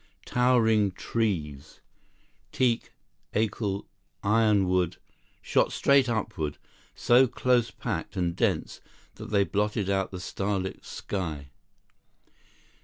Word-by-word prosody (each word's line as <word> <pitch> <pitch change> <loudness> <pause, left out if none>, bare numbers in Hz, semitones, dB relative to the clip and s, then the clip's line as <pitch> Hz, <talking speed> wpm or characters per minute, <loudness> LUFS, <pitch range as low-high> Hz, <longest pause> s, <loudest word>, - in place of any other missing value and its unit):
Towering 110 -5 +3
trees, 80 -12 -3 0.7
teak, 120 -3 0 0.4
acle, 105 -2 -1 0.4
ironwood, 100 -5 +2 0.5
shot - - +2
straight 140 -2 +3
upward, 85 -10 -2 0.4
so 125 +2 +5
close 120 -1 +1
packed - - -5
and 85 -2 0
dense - - -1 0.4
that - - -8
they 100 -2 +3
blotted 105 0 -1
out 95 -1 0
the 90 - -7
starlit 95 +1 -3
sky. 75 -8 -5
100 Hz, 95 wpm, -27 LUFS, 90-115 Hz, 0.7 s, so